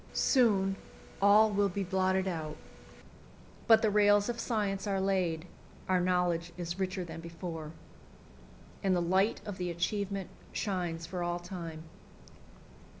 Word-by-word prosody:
Soon 200 Hz, -7 st, +3 dB, 0.4 s
all 210 Hz, +2 st, +6 dB
will 200 Hz, 0 st, +2 dB
be 195 Hz, +2 st, -2 dB
blotted 190 Hz, +1 st, +1 dB
out. 155 Hz, -4 st, -4 dB, 1.1 s
But 225 Hz, 0 st, +7 dB
the 215 Hz, -, +3 dB
rails 205 Hz, +1 st, +4 dB
of 235 Hz, -1 st, -3 dB
science 205 Hz, -4 st, -1 dB
are 195 Hz, -1 st, 0 dB
laid; 185 Hz, -4 st, 0 dB, 0.4 s
our 185 Hz, -1 st, +2 dB
knowledge 175 Hz, -1 st, +1 dB
is 175 Hz, +1 st, -4 dB
richer 185 Hz, -1 st, -1 dB
than 165 Hz, -1 st, -8 dB
before. 165 Hz, -2 st, -6 dB, 1.1 s
And 190 Hz, -2 st, +2 dB
the -, -, +2 dB
light 190 Hz, +5 st, +2 dB
of 200 Hz, -3 st, -6 dB
the 180 Hz, -1 st, -2 dB
achievement 195 Hz, +2 st, -2 dB, 0.2 s
shines 175 Hz, -5 st, -2 dB
for 180 Hz, +1 st, -5 dB
all 175 Hz, 0 st, -1 dB
time. 170 Hz, -3 st, -7 dB
185 Hz, 135 wpm, -31 LUFS, 175-200 Hz, 1.1 s, But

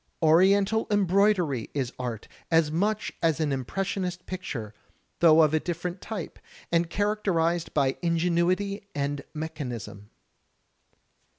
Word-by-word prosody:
Oriental 195 Hz, +7 st, +4 dB
embroidery 190 Hz, -, +2 dB
is 130 Hz, -4 st, -2 dB
art 120 Hz, -4 st, -4 dB, 0.2 s
as 165 Hz, -2 st, +3 dB
much 205 Hz, +6 st, -1 dB
as 165 Hz, -2 st, +2 dB
an 155 Hz, -2 st, 0 dB
impressionist 180 Hz, +6 st, -3 dB
picture, 125 Hz, -, -5 dB, 0.5 s
though 165 Hz, -1 st, +7 dB
of 155 Hz, 0 st, +2 dB
a 155 Hz, -, +3 dB
different 175 Hz, +2 st, -4 dB
type, 210 Hz, -6 st, -6 dB, 0.3 s
and 170 Hz, 0 st, +2 dB
characterized 175 Hz, -4 st, 0 dB
by 135 Hz, -3 st, +2 dB
ingenuity 180 Hz, +4 st, 0 dB
and 140 Hz, 0 st, -2 dB
mechanism. 130 Hz, -10 st, -6 dB
170 Hz, 110 wpm, -27 LUFS, 150-190 Hz, 0.5 s, though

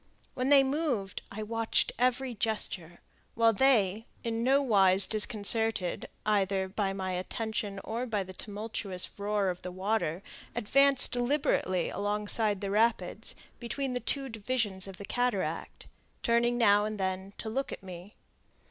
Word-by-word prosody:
When 255 Hz, +1 st, -1 dB
they 280 Hz, -1 st, +7 dB
moved 265 Hz, -8 st, -2 dB
I 215 Hz, +2 st, -5 dB
watched 225 Hz, +1 st, 0 dB
every 255 Hz, +1 st, +1 dB
gesture, 195 Hz, -6 st, -3 dB, 0.3 s
while 230 Hz, 0 st, +4 dB
they, 220 Hz, -4 st, +2 dB, 0.2 s
in 230 Hz, 0 st, -2 dB
no 270 Hz, +3 st, +4 dB
wise 195 Hz, -5 st, +7 dB
disconcerted 215 Hz, -2 st, +1 dB, 0.2 s
either 195 Hz, -2 st, +1 dB
by 195 Hz, 0 st, -2 dB
my 190 Hz, -1 st, -3 dB
attention 205 Hz, +2 st, -3 dB
or 235 Hz, +3 st, -3 dB
by 210 Hz, -4 st, -1 dB
the 185 Hz, 0 st, -10 dB
tumultuous 205 Hz, -2 st, -4 dB
roar 205 Hz, -1 st, 0 dB
of 180 Hz, -, -9 dB
the 180 Hz, -, -6 dB
water, 190 Hz, -2 st, -2 dB, 0.3 s
advanced 275 Hz, +4 st, +3 dB
deliberately 245 Hz, -, 0 dB
alongside 205 Hz, 0 st, -1 dB
the 200 Hz, -1 st, -3 dB
rapids, 215 Hz, -1 st, 0 dB, 0.2 s
between 260 Hz, +2 st, -3 dB
the 250 Hz, -, -1 dB
two 275 Hz, +1 st, -1 dB
divisions 220 Hz, -4 st, -2 dB
of 190 Hz, -1 st, -9 dB
the 200 Hz, -, -8 dB
cataract, 245 Hz, -3 st, -2 dB, 0.4 s
turning 235 Hz, +1 st, +2 dB
now 205 Hz, -3 st, +5 dB
and 215 Hz, 0 st, -4 dB
then 190 Hz, +1 st, -3 dB
to -, -, -6 dB
look 270 Hz, +5 st, -2 dB
at -, -, -8 dB
me. 185 Hz, +2 st, -10 dB
215 Hz, 145 wpm, -30 LUFS, 195-235 Hz, 0.4 s, they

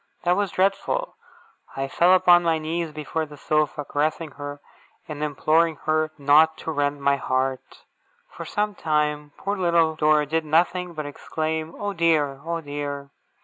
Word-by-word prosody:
That 175 Hz, +1 st, +3 dB
was 200 Hz, 0 st, 0 dB
dreadful. 195 Hz, +3 st, 0 dB, 0.6 s
I 135 Hz, 0 st, -1 dB
fell 175 Hz, +6 st, +4 dB
upon 180 Hz, -1 st, +6 dB
my 165 Hz, -2 st, +1 dB
knees 160 Hz, +1 st, -3 dB
before 155 Hz, +1 st, -4 dB
the 150 Hz, 0 st, -12 dB
sofa, 150 Hz, 0 st, 0 dB
caressing 155 Hz, +2 st, -1 dB
her, 145 Hz, 0 st, -7 dB, 0.5 s
and 150 Hz, -1 st, -6 dB
imploring 155 Hz, +2 st, +2 dB
her 155 Hz, 0 st, +1 dB
not 155 Hz, +3 st, +4 dB
to 160 Hz, -, -1 dB
rend 145 Hz, -1 st, -1 dB
my 140 Hz, 0 st, +3 dB
heart; 130 Hz, 0 st, -1 dB
but, -, -, -18 dB, 0.5 s
for -, -, -9 dB
some 210 Hz, 0 st, -1 dB
time, 150 Hz, -3 st, -1 dB
poor 200 Hz, +1 st, -2 dB
little 170 Hz, -4 st, +2 dB
Dora 150 Hz, -1 st, +3 dB
did 160 Hz, +2 st, -1 dB
nothing 175 Hz, +3 st, +1 dB
but 155 Hz, -1 st, -4 dB
exclaim 155 Hz, +2 st, -4 dB
Oh 205 Hz, -1 st, -3 dB
dear! 155 Hz, -6 st, +1 dB
Oh 165 Hz, 0 st, -3 dB
dear! 145 Hz, -1 st, -5 dB
155 Hz, 160 wpm, -24 LUFS, 145-170 Hz, 0.6 s, upon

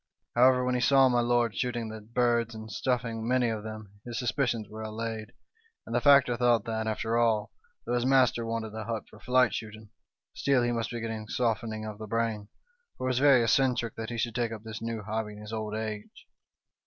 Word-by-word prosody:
However, 125 Hz, +1 st, +5 dB
when 125 Hz, -, +1 dB
he 125 Hz, -, 0 dB
saw 135 Hz, +1 st, +5 dB
my 120 Hz, -1 st, +2 dB
lord 120 Hz, -1 st, +2 dB
shooting 120 Hz, -3 st, -2 dB
the 110 Hz, 0 st, -8 dB
birds 115 Hz, +1 st, 0 dB
and 110 Hz, 0 st, -8 dB
stuffing 115 Hz, 0 st, -1 dB
many 125 Hz, -1 st, +2 dB
of 110 Hz, -2 st, -3 dB
them 110 Hz, -2 st, -9 dB
his 120 Hz, -1 st, -6 dB
suspicions 120 Hz, -3 st, -1 dB
were 110 Hz, 0 st, -9 dB
allayed, 110 Hz, 0 st, -5 dB, 0.5 s
and -, -, -7 dB
the 120 Hz, -, +2 dB
factor 140 Hz, -3 st, +6 dB
thought 120 Hz, -3 st, +2 dB
that, 110 Hz, -1 st, -2 dB
after 110 Hz, +1 st, 0 dB
all, 110 Hz, -3 st, +1 dB, 0.3 s
though -, -, -2 dB
his 120 Hz, -1 st, +1 dB
master 130 Hz, -2 st, +3 dB
wanted 115 Hz, -1 st, -3 dB
the 110 Hz, 0 st, -6 dB
hut 115 Hz, -1 st, -3 dB
for -, -, -16 dB
flight 125 Hz, 0 st, +3 dB
shooting, 110 Hz, -1 st, -7 dB, 0.4 s
still 135 Hz, -3 st, +2 dB
he 120 Hz, -, +1 dB
must 115 Hz, -1 st, -2 dB
be 120 Hz, -1 st, -5 dB
getting 110 Hz, -1 st, -4 dB
softening 110 Hz, -2 st, -1 dB
of 105 Hz, -1 st, -7 dB
the 110 Hz, -, -6 dB
brain, 115 Hz, -2 st, -1 dB, 0.5 s
for -, -, -4 dB
it -, -, +1 dB
was 125 Hz, -, +1 dB
very 135 Hz, -4 st, +6 dB
eccentric 120 Hz, -1 st, +2 dB
that 110 Hz, 0 st, -6 dB
he 120 Hz, -, -4 dB
should 115 Hz, 0 st, -1 dB
take 120 Hz, -1 st, -1 dB
up 110 Hz, -1 st, -7 dB
this 110 Hz, -1 st, -7 dB
new 115 Hz, -1 st, -4 dB
hobby 110 Hz, 0 st, -3 dB
in 105 Hz, -, -11 dB
his 105 Hz, +1 st, -8 dB
old 110 Hz, -1 st, -3 dB
age. 110 Hz, -1 st, -6 dB
115 Hz, 215 wpm, -29 LUFS, 110-120 Hz, 0.5 s, factor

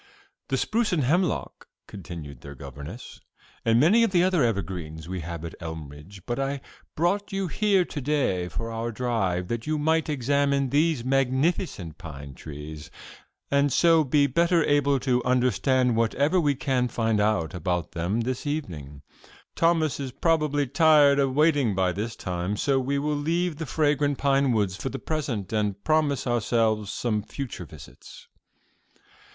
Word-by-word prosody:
"The -, -, 0 dB
spruce 230 Hz, 0 st, 0 dB
and 165 Hz, -6 st, +1 dB
hemlock," 175 Hz, +6 st, -1 dB, 0.2 s
continued 80 Hz, -8 st, -9 dB
their 70 Hz, 0 st, -10 dB
governess, 70 Hz, -, -9 dB, 0.4 s
"and 115 Hz, 0 st, +3 dB
many 185 Hz, -, +5 dB
of 230 Hz, -, +3 dB
the 180 Hz, -2 st, +3 dB
other 180 Hz, -5 st, +2 dB
evergreens, 85 Hz, -7 st, -3 dB
we 95 Hz, +1 st, -4 dB
have 85 Hz, 0 st, -6 dB
at 80 Hz, -, -7 dB
Elmridge, 80 Hz, +3 st, -9 dB
but 120 Hz, +2 st, -3 dB
I 135 Hz, +1 st, -1 dB, 0.4 s
brought 195 Hz, +6 st, 0 dB
you 195 Hz, 0 st, -1 dB
here 195 Hz, +1 st, +2 dB
to 145 Hz, -, -6 dB
day 125 Hz, -11 st, 0 dB
for 115 Hz, +6 st, -5 dB
our 115 Hz, +1 st, -3 dB
drive 105 Hz, -7 st, -1 dB
that 115 Hz, +1 st, -3 dB
you 155 Hz, 0 st, 0 dB
might 160 Hz, +1 st, +1 dB
examine 140 Hz, -1 st, +1 dB
these 150 Hz, -4 st, +2 dB
magnificent 130 Hz, -, 0 dB
pine 70 Hz, -5 st, -9 dB
trees, 75 Hz, +2 st, -9 dB, 0.6 s
and 140 Hz, 0 st, +3 dB
so 165 Hz, +2 st, +4 dB
be 145 Hz, +1 st, +3 dB
better 170 Hz, +4 st, +2 dB
able 140 Hz, -2 st, +2 dB
to 125 Hz, -2 st, +1 dB
understand 125 Hz, 0 st, +2 dB
whatever 140 Hz, +10 st, +2 dB
we 145 Hz, -3 st, +2 dB
can 130 Hz, -2 st, 0 dB
find 115 Hz, -2 st, 0 dB
out 105 Hz, -6 st, 0 dB
about 90 Hz, -1 st, -2 dB
them 90 Hz, +7 st, -1 dB
this 130 Hz, +4 st, -3 dB
evening. 75 Hz, -, -5 dB, 0.5 s
Thomas 165 Hz, -3 st, +2 dB
is 135 Hz, -2 st, -4 dB
probably 150 Hz, 0 st, +1 dB
tired 145 Hz, 0 st, +5 dB
of 135 Hz, -2 st, +1 dB
waiting 145 Hz, -8 st, +3 dB
by 95 Hz, -1 st, +2 dB
this 105 Hz, +5 st, -4 dB
time; 90 Hz, +2 st, -3 dB
so 135 Hz, +4 st, +2 dB
we 135 Hz, +2 st, -1 dB
will 150 Hz, +2 st, -1 dB
leave 165 Hz, +2 st, -1 dB
the 160 Hz, -1 st, -5 dB
fragrant 145 Hz, -2 st, +1 dB
pine 140 Hz, -1 st, +2 dB
woods 100 Hz, -5 st, 0 dB
for 95 Hz, -, -4 dB
the 135 Hz, -, -5 dB
present, 130 Hz, -, -3 dB
and 105 Hz, -2 st, -1 dB
promise 155 Hz, -3 st, +1 dB
ourselves 115 Hz, -3 st, +1 dB
some 110 Hz, -3 st, -1 dB
future 120 Hz, -5 st, -6 dB
visits." 70 Hz, -5 st, -13 dB
125 Hz, 155 wpm, -26 LUFS, 95-150 Hz, 0.6 s, many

